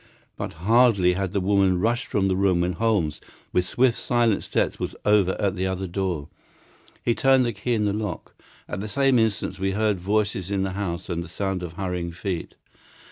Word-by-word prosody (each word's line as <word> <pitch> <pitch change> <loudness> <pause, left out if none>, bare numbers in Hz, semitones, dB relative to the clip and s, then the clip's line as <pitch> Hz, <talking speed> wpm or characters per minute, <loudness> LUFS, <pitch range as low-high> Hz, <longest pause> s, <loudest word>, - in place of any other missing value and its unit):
But - - -5
hardly 100 0 +4
had 95 +1 -1
the 100 - 0
woman 95 -1 +2
rushed 120 +6 0
from 100 -2 +1
the 95 - +1
room 95 -2 +2
when 90 +1 0
Holmes, 100 -6 0 0.3
with 90 0 +1
swift, 125 +2 +2
silent 120 -3 +1
steps, - - -1
was - - -4
over 105 -3 +3
at 100 -2 0
the 95 0 -1
other 95 0 -2
door. 90 -5 -2 0.8
He 120 - +3
turned 135 +1 +4
the 120 - -1
key 115 +4 -1
in 105 -1 +1
the 100 - +1
lock. 105 0 -4 0.3
At 90 - -4
the 105 - -4
same 135 +2 +3
instant 110 -4 -1
we 95 0 0
heard 105 -2 +1
voices 100 -1 -1
in 100 -1 0
the 95 - -2
house 95 -2 -4
and 85 -2 -2
the - - -10
sound 95 +3 -3
of 85 -2 -6
hurrying 90 -2 -3
feet. 90 0 -4
95 Hz, 200 wpm, -24 LUFS, 90-110 Hz, 0.8 s, hardly